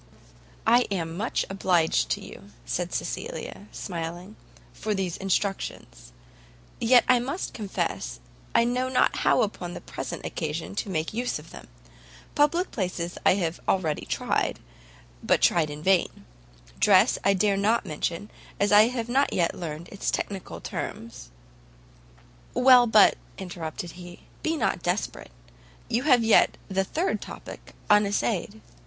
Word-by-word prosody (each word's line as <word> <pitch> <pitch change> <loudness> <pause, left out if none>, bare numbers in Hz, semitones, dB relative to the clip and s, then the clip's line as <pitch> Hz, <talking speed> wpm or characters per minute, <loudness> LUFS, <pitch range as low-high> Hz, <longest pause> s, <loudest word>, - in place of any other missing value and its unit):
"I 240 +2 +4
am 165 -4 -3
much 220 +7 -1
obliged 180 -4 +1
to - - -1
you," 100 - -12 0.2
said - - -2
Cecilia, 100 +2 -5
smiling, 170 - -6 0.4
"for 215 -1 -2
these 185 -3 -2
instructions; 190 - -3 0.7
yet 245 +1 +5
I 250 -1 +5
must 275 +9 -4
confess 190 - -3 0.4
I - - +6
know 250 +2 0
not 260 - +2
how - - +3
upon - - -4
the - - -5
present - - -6
occasion 160 +3 -4
to 205 - -2
make 160 -1 -2
use 245 +3 -1
of - - -13
them: - - -11 0.7
public 335 +5 +2
places 180 -4 -3
I - - +6
have 175 -3 -2
already 165 -6 0
tried, - - -1 0.6
but - - +2
tried 165 -3 +3
in 150 +1 -8
vain; 190 -1 +1 0.5
dress - - +5
I 195 +1 +4
dare 200 +1 +2
not 215 +4 +1
mention, 170 +6 -3 0.3
as 200 - +2
I 210 +2 +7
have 240 -2 -3
not 270 +4 +2
yet 170 -2 +1
learned 165 0 -6
its 200 - -3
technical 195 -2 -4
terms 110 - -6 0.6
" - - -28 0.5
"Well, 250 -1 +7
but," 215 -2 +6 0.2
interrupted 170 -2 -6
he, 175 0 -11 0.2
"be 320 0 -1
not 220 - 0
desperate; 180 +4 -2 0.6
you 235 - +1
have 245 -3 +6
yet 225 -1 +4
the 190 0 +1
third 330 - -1
topic - - -10
unessayed." 210 0 +1
195 Hz, 140 wpm, -26 LUFS, 170-230 Hz, 0.7 s, I